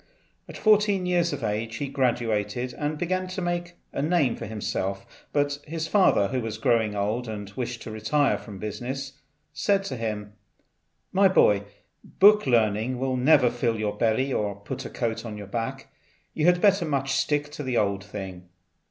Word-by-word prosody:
At -, -, -8 dB
fourteen 205 Hz, -3 st, +3 dB
years 175 Hz, -1 st, +2 dB
of 145 Hz, -4 st, -5 dB
age 110 Hz, +2 st, -2 dB
he 140 Hz, +4 st, -3 dB
graduated 120 Hz, -2 st, -1 dB
and 150 Hz, +2 st, -3 dB
began 185 Hz, +3 st, -1 dB
to 185 Hz, +1 st, -5 dB
make 175 Hz, 0 st, -2 dB, 0.2 s
a -, -, -2 dB
name 150 Hz, -5 st, +2 dB
for -, -, -7 dB
himself; 100 Hz, -2 st, -3 dB, 0.3 s
but 145 Hz, 0 st, 0 dB
his 160 Hz, +1 st, -3 dB
father, 170 Hz, -, +4 dB
who 130 Hz, +1 st, -1 dB
was 110 Hz, -1 st, -4 dB
growing 110 Hz, -2 st, +1 dB
old 105 Hz, +5 st, -1 dB
and 105 Hz, -2 st, -6 dB
wished 120 Hz, +2 st, -5 dB
to -, -, -7 dB
retire 110 Hz, +7 st, +1 dB
from 105 Hz, -4 st, -10 dB
business, 135 Hz, +7 st, -5 dB, 0.3 s
said 195 Hz, +6 st, +1 dB
to 135 Hz, -9 st, -4 dB
him, 105 Hz, -2 st, -4 dB, 0.8 s
"My 195 Hz, +1 st, +5 dB
boy, 105 Hz, -, +4 dB, 0.4 s
book 210 Hz, -4 st, +5 dB
learning 115 Hz, +1 st, +2 dB
will 130 Hz, 0 st, -1 dB
never 125 Hz, -1 st, +5 dB
fill 120 Hz, -2 st, 0 dB
your 105 Hz, -1 st, -2 dB
belly 120 Hz, +5 st, +1 dB
or 105 Hz, -2 st, -1 dB
put 100 Hz, 0 st, -7 dB
a -, -, -5 dB
coat 115 Hz, -2 st, -2 dB
on 110 Hz, -3 st, -6 dB
your 105 Hz, -, -7 dB
back; 115 Hz, +3 st, -5 dB, 0.4 s
you 155 Hz, +1 st, +1 dB
had 175 Hz, 0 st, +4 dB
much 200 Hz, -1 st, +5 dB, 0.2 s
better 135 Hz, -, -8 dB
stick 145 Hz, +2 st, 0 dB
to 150 Hz, -, -6 dB
the 130 Hz, -4 st, -1 dB
old 100 Hz, -1 st, +1 dB
thing." 95 Hz, -4 st, -8 dB
125 Hz, 180 wpm, -26 LUFS, 105-150 Hz, 0.8 s, My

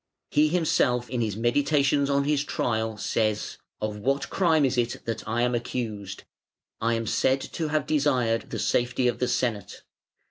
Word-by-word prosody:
He 150 Hz, +1 st, +4 dB
himself 125 Hz, -8 st, +1 dB
in 125 Hz, -2 st, -1 dB
his 110 Hz, -3 st, -1 dB
meditations 140 Hz, +4 st, +2 dB
on 140 Hz, 0 st, +2 dB
his 145 Hz, 0 st, +1 dB
trial 110 Hz, -5 st, -1 dB
says: 110 Hz, 0 st, -1 dB, 0.2 s
"Of 105 Hz, -1 st, -3 dB
what 135 Hz, +6 st, -1 dB
crime 160 Hz, -6 st, +3 dB
is 130 Hz, -1 st, 0 dB
it 120 Hz, -1 st, -2 dB
that 115 Hz, -1 st, -4 dB
I 115 Hz, +2 st, 0 dB
am 125 Hz, 0 st, +1 dB
accused? 110 Hz, -5 st, -4 dB, 0.6 s
I 115 Hz, +1 st, +2 dB
am 115 Hz, 0 st, -2 dB
said 130 Hz, +4 st, +2 dB
to 160 Hz, +4 st, -4 dB
have 155 Hz, 0 st, 0 dB
desired 130 Hz, -7 st, +1 dB
the -, -, -4 dB
safety 125 Hz, +1 st, +1 dB
of 120 Hz, -, -1 dB
the 125 Hz, -, +1 dB
Senate. 110 Hz, -7 st, -2 dB
125 Hz, 170 wpm, -26 LUFS, 115-140 Hz, 0.6 s, He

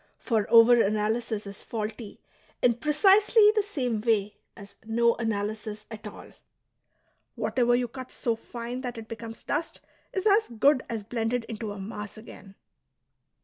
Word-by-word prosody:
For 220 Hz, -4 st, 0 dB
over 230 Hz, +1 st, +7 dB
analysis 215 Hz, +1 st, -1 dB
is 200 Hz, 0 st, -10 dB
faulty 215 Hz, -1 st, -6 dB, 0.4 s
in 245 Hz, -, +5 dB
precisely 405 Hz, -, +5 dB
the 425 Hz, -, +4 dB
same 255 Hz, -, -2 dB
way 210 Hz, -3 st, +1 dB, 0.2 s
as 200 Hz, 0 st, -12 dB
no 235 Hz, +1 st, +2 dB
analysis 215 Hz, -1 st, -3 dB
at 215 Hz, -1 st, -8 dB
all; 210 Hz, -, -11 dB, 1.0 s
whatever 240 Hz, -1 st, +1 dB
you 245 Hz, 0 st, 0 dB
cut 255 Hz, +2 st, -9 dB
so 230 Hz, -2 st, -1 dB
fine 240 Hz, +2 st, -7 dB
that 245 Hz, -3 st, -5 dB
it 225 Hz, -1 st, -8 dB
becomes 230 Hz, 0 st, -8 dB
dust 315 Hz, +3 st, -3 dB, 0.3 s
is 380 Hz, +1 st, -3 dB
as 430 Hz, +1 st, +4 dB
good 255 Hz, +4 st, +3 dB
as 225 Hz, -3 st, -4 dB
blended 230 Hz, +2 st, -2 dB
into 220 Hz, -2 st, -6 dB
a 205 Hz, -, -7 dB
mass 210 Hz, +1 st, -7 dB
again.'' 205 Hz, -3 st, -13 dB
230 Hz, 145 wpm, -27 LUFS, 215-250 Hz, 1.0 s, over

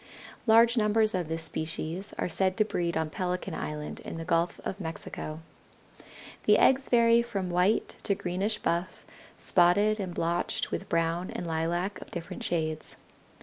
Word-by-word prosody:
Large 230 Hz, +2 st, +6 dB
numbers 215 Hz, 0 st, +3 dB
of 180 Hz, -3 st, -1 dB
this 160 Hz, 0 st, -3 dB
species 165 Hz, +4 st, -2 dB
are -, -, -1 dB
said 185 Hz, +2 st, +1 dB
to 215 Hz, -, +4 dB
breed 170 Hz, -5 st, -1 dB
on 160 Hz, -1 st, -1 dB
Pelican 180 Hz, +1 st, -3 dB
Island 150 Hz, 0 st, -4 dB
in -, -, -7 dB
the 165 Hz, -, -5 dB
Gulf 170 Hz, 0 st, +1 dB
of 195 Hz, -, -4 dB
Mexico. 160 Hz, -2 st, -6 dB, 1.0 s
The -, -, +6 dB
eggs 265 Hz, +1 st, +4 dB
vary 235 Hz, -1 st, +5 dB
from 195 Hz, -6 st, -3 dB
white 180 Hz, +5 st, +1 dB
to 200 Hz, -, 0 dB
greenish 195 Hz, +3 st, -1 dB
buff, 170 Hz, +2 st, -2 dB, 0.3 s
spotted 205 Hz, +5 st, +3 dB
and 185 Hz, -3 st, -4 dB
blotched 170 Hz, +1 st, -1 dB
with -, -, -4 dB
brown 165 Hz, +2 st, 0 dB
and 180 Hz, -, -5 dB
lilac 170 Hz, +4 st, -1 dB
of -, -, -10 dB
different 170 Hz, -1 st, -6 dB
shades. 155 Hz, -2 st, -2 dB
180 Hz, 155 wpm, -29 LUFS, 165-205 Hz, 1.0 s, Large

